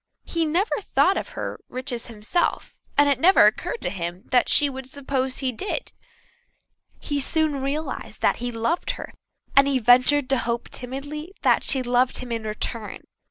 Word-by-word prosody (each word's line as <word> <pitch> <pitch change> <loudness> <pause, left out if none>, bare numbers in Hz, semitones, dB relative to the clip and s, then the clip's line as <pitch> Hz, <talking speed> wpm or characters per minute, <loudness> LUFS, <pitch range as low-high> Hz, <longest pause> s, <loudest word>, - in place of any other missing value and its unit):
He 335 -1 -1
never 360 +8 0
thought 385 0 +2
of - - -3
her - - -4
riches 250 -2 -4
himself, 230 +10 -1 0.2
and 290 0 +6
it 280 -3 +2
never 370 +7 +6
occurred 485 - 0
to - - -1
him 175 -1 -5
that 250 -1 +3
she 290 - +5
would 265 -1 -7
suppose 265 -1 -2
he 265 -2 0
did. 400 - -4 1.1
He 290 -1 -2
soon 300 -1 +1
realized 285 +4 -4
that - - +3
he 245 0 -3
loved 235 +9 -1
her, - - -8 0.4
and 275 0 +7
he 275 -1 +2
ventured 255 +4 +4
to 270 - +2
hope 235 0 -3
timidly 290 +8 -7
that - - +4
she 265 -3 +2
loved 245 +1 +2
him 250 -1 -6
in 225 -1 -3
return. 215 0 -4
265 Hz, 170 wpm, -24 LUFS, 245-295 Hz, 1.1 s, and